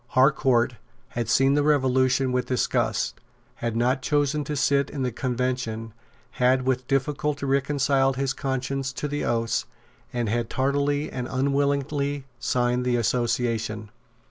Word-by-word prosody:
Harcourt 130 -3 +3 0.3
had 120 -2 -3
seen 135 +3 +4
the 145 - +3
Revolution 130 -2 +2
with 125 0 0
disgust, 125 - 0 0.4
had 115 -1 -3
not 125 +3 +1
chosen 145 +2 +1
to 150 - -3
sit 140 0 +2
in 140 -3 -3
the 125 - 0
Convention, 120 -2 -2 0.4
had 130 0 +2
with 130 -1 -1
difficulty 140 +1 -1
reconciled 135 -1 +2
his 135 -1 0
conscience 135 0 -2
to 145 - -3
the 145 0 -3
oaths, 115 -1 0 0.4
and 120 -2 -1
had 115 +1 -1
tardily 145 +2 0
and 125 -1 -4
unwillingly 140 +1 0
signed 125 0 +1
the 125 -1 +1
Association. 115 -2 -1
130 Hz, 135 wpm, -25 LUFS, 120-140 Hz, 0.4 s, seen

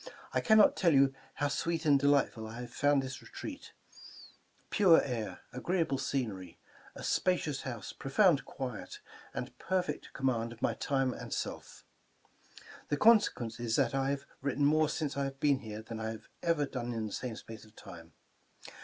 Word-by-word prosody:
I - - +2
cannot 220 -2 +6
tell 170 -5 +3
you 135 0 +5 0.2
how 145 - 0
sweet 165 +3 -1
and 145 -2 +5
delightful 140 -5 +2
I 115 +2 -7
have 120 -1 -9
found 145 0 +3
this^^^e^rt^pure 165 +6 -2
air, 115 -4 -4
agTSe 165 +7 0
^le 135 -2 -2
scenery, 100 -10 -3 0.4
a - - -8
spacT6us~'hous"e, 135 - -1
profound 155 +2 +3
quiet,"and 125 -5 -7
per^ 185 +2 0
f 180 -3 -1
ect 150 - -5
<Jomm^iid 115 -4 0
of 115 - -16
Tny - - 0
1±rae' 135 -2 0
and^ - - -6
s^^^ - - -5 1.8
is, 120 -2 -2
th^t 135 -4 +2
1 135 0 +1
have 140 0 -2 0.2
written 140 +1 +1
"mofe" 155 +1 +4
since 150 -2 -2
I~have 135 -1 -3
been 140 -2 +3
here 110 -3 -7
than 110 0 -7
I 110 0 -2
have 110 -1 -8
ever 165 -4 +2
done 120 -3 -4
in 110 -1 -2
the 105 - -6
same 125 -3 -4
space 110 0 -10
of 110 0 -19
time. 85 -5 -12
135 Hz, 160 wpm, -32 LUFS, 115-145 Hz, 1.8 s, cannot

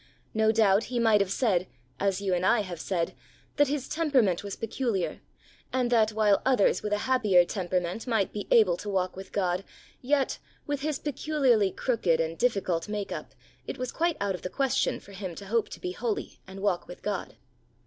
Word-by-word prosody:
No 220 0 +3
doubt 215 -2 +4
he 245 - -4
might 220 -3 +4
have 200 - 0
said, 190 -5 +1 0.3
as 195 -1 0
you 195 -2 0
and 180 0 0
I 235 +3 +4
have 180 -5 -6
said, 170 -1 -1 0.4
that 290 0 +5
his 280 -1 -2
temperament 260 - +2
was 200 -1 -5
peculiar, 225 -4 -2 0.5
and 250 -2 0
that 220 -3 +4
while 210 -2 +3
others 255 -6 +3
with 210 - -3
a 210 - +2
happier 210 -9 +4
temperament 180 +4 -2
might 220 -5 +1
be 205 - -5
able 185 -7 +5
to 205 - -6
walk 185 -2 -1
with 190 +1 -9
God, 185 -1 0 0.4
yet, 275 +1 +1 0.3
with 290 -1 -2
his 300 -1 -1
peculiarly 270 -8 +2
crooked 185 -7 +1
and 165 0 -1
difficult 195 -6 0
make 210 -1 -3
up, - - -6 0.3
it - - -4
was 255 -1 -3
quite 335 0 0
out 200 -1 0
of 180 - -6
the 185 - -4
question 270 +4 0
for 200 - -15
him 190 -3 -6
to 200 - -9
hope 225 +3 0
to - - -9
be 360 - -3
holy 405 +1 -3
and 190 +1 -9
walk 195 -4 0
with 180 - -11
God. 205 -3 -3
210 Hz, 200 wpm, -28 LUFS, 185-250 Hz, 0.5 s, that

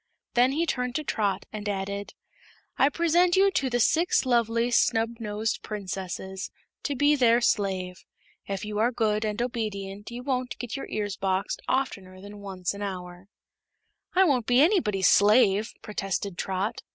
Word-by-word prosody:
Then 250 +2 +4
he 325 +4 +1
turned 250 -5 -2
to 310 - -1
Trot 205 -8 -1
and 210 -1 -4
added: 200 0 -4 0.6
"I 270 - +4
present 340 +3 +3
you 390 +1 +5
to 270 -8 0
the 245 0 0
Six 325 +6 +3
Lovely 235 -1 +1
Snubnosed 225 -2 0
Princesses, 190 -2 -5 0.3
to 285 - -2
be 290 +2 +4
their 240 -3 +4
slave. 190 -5 -1 0.4
If 195 0 -4
you 210 0 -3
are 235 +3 +3
good 215 -3 0
and 210 0 -2
obedient 210 -4 -4
you 240 +1 -7
won't 255 -2 -2
get 245 0 -5
your 275 - -5
ears 205 -2 -3
boxed 190 0 -1
oftener 195 -8 -2
than 205 +1 -11
once 190 -2 -4
an 200 - -8
hour." 180 -2 -6 0.9
"I 380 - +6
won't 260 - +2
be 245 +1 +4
anybody's 275 - +3
slave," 210 0 +4
protested 195 -2 -3
Trot. 190 +3 -2
215 Hz, 155 wpm, -27 LUFS, 195-250 Hz, 0.9 s, I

